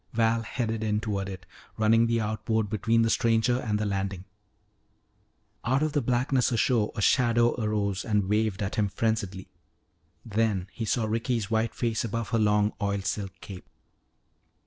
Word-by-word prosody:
Val 115 0 +2
headed 115 -1 -3
in 105 -1 +1
toward 100 -3 -3
it, 95 -2 -8 0.3
running 115 +1 +4
the 115 0 +1
outboard 110 0 -1
between 115 +1 +2
the 115 - +2
stranger 115 +2 +2
and 105 -4 -1
the 105 - -1
landing. 95 -2 -3 1.4
Out 130 +5 +1
of 155 - 0
the 145 - +2
blackness 125 0 +1
ashore 115 -2 +2
a 105 - -2
shadow 120 0 +3
arose 100 -3 -1
and 105 -4 0
waved 105 -1 0
at 100 +4 -4
him 105 -2 +2
frenziedly. 100 -2 -2 0.8
Then 105 -4 0
he 115 - -4
saw 110 +1 0
Ricky's 115 0 -1
white 110 +1 0
face 115 -2 -1
above 115 0 -3
her 115 -2 +1
long 105 0 +2
oil 100 -1 0
silk 100 0 -3
cape. 95 -3 -10
110 Hz, 160 wpm, -27 LUFS, 105-115 Hz, 1.4 s, running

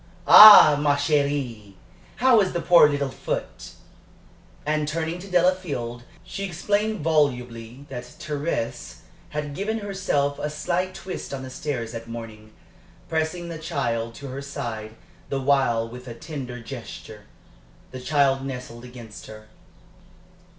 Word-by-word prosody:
"Ah, 205 -9 +10
ma 145 -1 +3
chérie! 140 -8 -1 0.4
How 245 -3 +4
is 190 - -1
the 175 - -1
poor 170 -3 +6
little 140 -2 -2
foot?" - - -5 0.9
And 155 0 0
turning 165 +2 -3
to 195 +2 -10
Delafield, 170 -10 0 0.2
she 195 - -6
explained 205 +3 -1
volubly 125 -5 -1
that 125 -2 -6
Thérèse 145 - -5 0.3
had 150 -1 -5
given 210 +8 -2
herself 190 -9 -1
a 150 - -2
slight 175 +5 -2
twist 185 -6 -6
on 130 - -7
the 130 - -8
stairs 125 -5 -4
that 115 -1 -8
morning, 110 -2 -9 0.6
pressing 165 +2 -2
the 165 -2 -6
child 120 -8 -3
to 140 -1 -8
her 135 +2 -6
side 110 -5 -6 0.3
the 135 - -2
while 130 -4 +1
with 125 +2 -11
a 120 - -7
tender 130 -4 -7
gesture. 115 -3 -10 0.7
The 130 - -8
child 135 -1 +1
nestled 125 -3 -7
against 120 -3 -11
her. 110 0 -12
140 Hz, 135 wpm, -24 LUFS, 120-160 Hz, 0.9 s, Ah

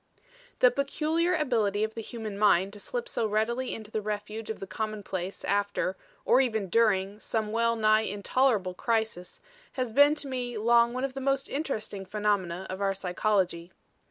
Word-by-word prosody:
The 250 - +7
peculiar 310 +6 0
ability 220 -9 +1
of 220 0 -2
the 225 - -5
human 220 -2 -6
mind 200 -2 +3
to 205 - -10
slip 485 - -4
so 230 - -1
readily 235 +4 0
into 220 -1 -9
the 215 - -1
refuge 210 +1 -5
of 220 - -4
the - - -5
commonplace 195 -3 -4
after, 200 -2 0 0.3
or 255 - +5
even 220 -7 -1
during, 205 -2 +2
some 220 -1 -2
well 230 +1 +2
nigh 215 -1 +4
intolerable 205 -1 +1
crisis, 220 -3 -2 0.3
has 255 -4 -2
been 285 +5 +6
to 295 - -5
me 245 -3 -3
long 235 +2 +4
one 255 - -2
of 270 -1 -2
the 270 - -5
most 275 0 0
interesting 220 -9 -3
phenomena 190 -3 -1
of 190 +1 -6
our 195 -1 +1
psychology. 185 -2 -1
220 Hz, 170 wpm, -28 LUFS, 200-245 Hz, 0.3 s, The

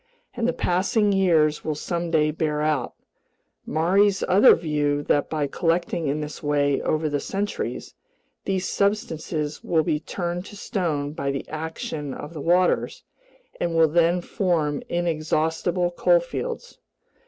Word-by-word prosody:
And 240 -1 -1
the - - +3
passing 205 0 +1
years 165 -6 +3
will 155 -1 -2
someday 165 -1 0
bear 150 -1 -1
out 150 -5 -1 0.7
Maury's 190 +6 +2
other 190 +3 +7
view 145 -3 -1
that 145 - +1
by 155 -2 0
collecting 165 +1 -1
in 145 +2 -1
this 150 0 -6
way 145 -1 +1
over 155 0 0
the 145 -1 -1
centuries, 200 +7 -4 0.5
these 190 -1 -1
substances 160 -7 -1
will 160 -2 +2
be 150 - 0
turned 175 +3 -4
to 205 - -11
stone 165 -9 -2
by 140 -3 -3
the 140 0 -3
action 155 -2 -5
of 150 +3 -8
the 155 - -6
waters 180 +4 +1 0.6
and 170 -1 -1
will 160 -1 +5
then 170 +2 +3
form 170 -7 0
inexhaustible 170 +1 0
coalfields. - - 0
165 Hz, 135 wpm, -24 LUFS, 150-180 Hz, 0.7 s, other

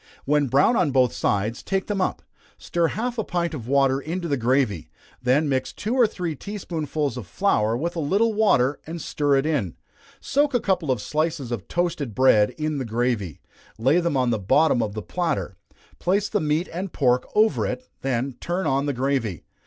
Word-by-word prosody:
When 145 0 +2
brown 140 - +4
on 180 -8 +2
both 130 -3 +3
sides, 105 +4 -1
take 195 -1 -1
them 205 -2 -2
up - - -1 0.3
stir 170 -1 0
half 235 +6 -3
a - - +1
pint 170 -2 -2
of 120 -7 -6
water 135 0 +3
into 170 +5 -4
the 145 - +1
gravy, 125 - 0 0.3
then 130 +5 +2
mix 130 -2 -1
two 215 +4 -3
or 250 -3 +5
three 175 -6 -4
tea 205 +9 -7
spoonsful 155 -6 -3
of 120 -7 -7
flour 115 - +1
with 170 +6 -3
a - - -2
little 200 +9 +2
water, 145 - +3
and 165 +1 -5
stir 145 -2 0
it 135 +1 +2
in 140 - -1 0.4
soak 285 -1 +1
a - - +4
couple 185 -8 0
of 125 -5 0
slices 155 -4 -1
of 115 -7 -4
toasted 155 - -2
bread 110 -5 +5
in 155 -2 -2
the - - -2
gravy, 115 - -2 0.4
lay 135 +9 +3
them 170 -5 0
on 125 -2 +2
the 110 - 0
bottom 120 +7 +3
of 105 -2 -3
the 110 - -4
platter, 170 - -2 0.4
place 200 +3 +1
the 210 - 0
meat 155 +3 0
and 185 +2 -4
pork 125 -3 +1
over 220 +1 +3
it, 255 - -5
then 130 0 -1
turn 175 +1 -2
on 140 0 +1
the 145 - 0
gravy. 125 - -1
145 Hz, 200 wpm, -24 LUFS, 125-175 Hz, 0.4 s, or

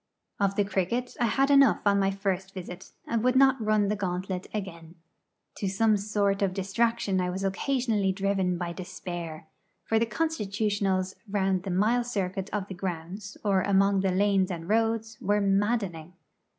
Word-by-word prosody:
Of 200 -1 +1
the 205 - +3
cricket 210 +6 -1
I 240 - +3
had 270 +5 +2
enough 275 -1 +5
on 200 -1 +4
my 195 0 +2
first 195 -1 -3
visit, 180 0 -8 0.2
and 230 -1 -1
would 255 0 +3
not 265 -2 +4
run 215 -1 +2
the 210 - 0
gauntlet 185 -1 -3
again. 170 -5 -6 0.6
To 200 - -2
some 215 +3 +3
sort 200 -1 0
of 190 -2 0
distraction 200 0 0
I 180 - -1
was 190 +2 -4
occasionally 215 0 0
driven 190 -2 0
by 170 -1 -3
despair; 175 -3 -7 0.4
for 225 - +1
the 230 - +1
constitutionals 205 - -1 0.2
round 195 -2 +1
the 190 - -6
mile 215 +7 +2
circuit 195 -4 -3
of 205 -2 -2
the 195 - -6
grounds, 185 +3 -6
or 195 -2 +3
among 195 0 +3
the 190 0 +1
lanes 195 0 +2
and 170 -2 -5
roads, 225 +1 0
were 205 +1 +2
maddening. 195 -4 0
195 Hz, 165 wpm, -27 LUFS, 185-215 Hz, 0.6 s, enough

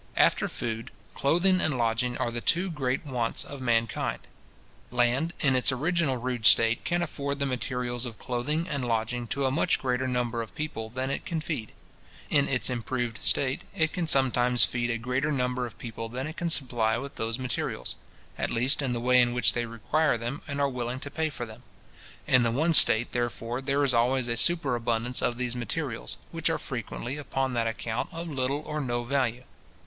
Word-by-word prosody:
After - - +4
food, 115 0 -4 0.2
clothing 185 +6 +3
and 150 -5 +1
lodging 120 +1 0
are 120 - -1
the 120 0 -4
two 180 +7 +2
great 135 -1 -1
wants 125 -5 0
of 140 -2 -8
mankind. 115 -3 0 0.7
Land, 125 +7 +1
in 135 -3 +4
its 125 - +3
original 150 0 +1
rude 125 -2 +1
state, 115 0 +5
can 175 0 0
afford 140 -3 -3
the 140 - 0
materials 125 -1 -2
of 115 - -8
clothing 150 +7 -2
and 140 -4 -2
lodging 120 +1 -1
to 140 +3 -1
a 130 - +2
much 165 +5 +2
greater 130 0 -1
number 120 -2 -1
of 115 - -8
people 150 -8 -4
than 130 +3 -3
it - - -3
can 165 -2 -2
feed. 150 -8 -4 0.6
In 140 -2 +4
its 130 -2 +1
improved 120 -1 -2
state, 130 -1 0
it 160 -1 +1
can 175 -2 -1
sometimes 125 -3 +4
feed 120 0 -2
a 115 - 0
greater 125 +6 -1
number 125 -2 0
of 115 - -13
people 115 -1 -6
than 130 +3 -4
it 155 +1 -6
can 170 -1 -2
supply 120 -7 +2
with 140 +3 -7
those 115 +1 -2
materials; 130 -2 -3 0.4
at - - 0
least 125 +5 +2
in 130 -3 0
the 120 - -1
way 125 +1 +5
in 120 0 +2
which 125 - +3
they 120 -1 -1
require 120 +5 +1
them, 120 +6 -4
and 140 -1 -3
are 140 - +3
willing 125 -1 -3
to 140 - -6
pay 160 +1 0
for 130 -5 -5
them. 110 +1 -12 0.6
In 125 -1 +5
the 120 - +3
one 155 +8 +2
state, 120 -5 +6
therefore, 120 0 -2
there 140 +1 +1
is 135 -2 +2
always 120 +2 +2
a 120 - 0
superabundance 120 -5 +1
of 120 - 0
these 125 -1 -2
materials, 110 - -3
which - - 0
are - - +1
frequently, 130 +4 -5
upon 135 -2 -2
that 115 -1 +1
account, 115 +1 -3
of 165 +1 -5
little 140 -1 -1
or 150 0 -3
no 120 -3 -1
value. 125 -2 0
125 Hz, 195 wpm, -28 LUFS, 120-140 Hz, 0.7 s, state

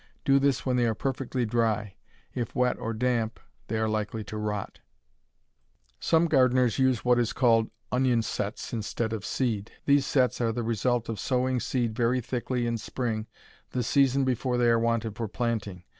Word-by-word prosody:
Do 135 0 +5
this 140 -1 +1
when 130 -1 +1
they 120 -1 +3
are 110 - 0
perfectly 130 0 -2
dry. 110 -3 0 0.4
If 120 +1 -4
wet 125 -1 +1
or 115 - -3
damp 115 -1 -1 0.3
they 110 - -2
are 110 0 +1
likely 110 0 -2
to 105 - -8
rot. 105 -2 -3 1.2
Some 165 +1 +3
gardeners 130 -5 +3
use 130 -3 +2
what 125 0 +4
is 120 - 0
called 115 -3 +3 0.2
onion 125 -2 +2
"sets" 105 +2 -4
instead 110 0 -2
of 110 -3 -4
seed. 110 -5 -2
These 140 -1 +3
"sets" 125 -4 +2
are 115 -1 +2
the 120 +1 -3
result 115 +1 0
of 115 -3 -4
sowing 130 +2 0
seed 120 -2 -1
very 120 +1 +2
thickly 125 +1 -2
in 115 -1 -1
spring 110 -2 -3 0.5
the 125 - 0
season 135 +2 +3
before 125 0 0
they 120 -1 +3
are 115 0 +4
wanted 115 -2 0
for 115 0 -3
planting. 105 -5 -3
120 Hz, 175 wpm, -27 LUFS, 110-125 Hz, 1.2 s, Do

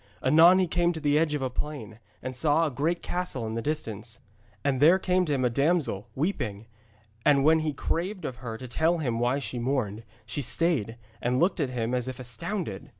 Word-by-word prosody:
Anon 165 +7 +7
he 190 - +3
came 175 0 +1
to 160 - -5
the 150 -1 +2
edge 155 -2 +1
of 145 - -2
a 130 - 0
plain, 125 -7 -5 0.2
and 130 0 -5
saw 155 +4 +3
a 155 - -1
great 160 +7 -1
castle 175 -10 -3
in 110 - -4
the 115 - -2
distance. 115 -7 -4 0.4
And 140 -2 0
there 165 +5 +7
came 185 -1 +1
to 150 - -1
him 130 -2 0
a - - +3
damsel, 140 - +1
weeping, 120 - -2 0.6
and 140 -2 +4
when 160 +2 +5
he 155 -1 -1
craved 180 +7 -3
of 125 - -4
her 115 -3 -6
to 130 - -8
tell 160 +8 +1
him 120 -8 -1
why 120 +3 +1
she 130 -3 -4
mourned, 120 -4 -1 0.2
she 145 - -3
stayed, 135 -6 0 0.2
and 125 +1 +1
looked 180 +3 +2
at 140 -4 0
him 120 -1 -2
as 125 -1 -1
if 130 -1 -6
astounded. 125 - -5
140 Hz, 210 wpm, -27 LUFS, 120-165 Hz, 0.6 s, Anon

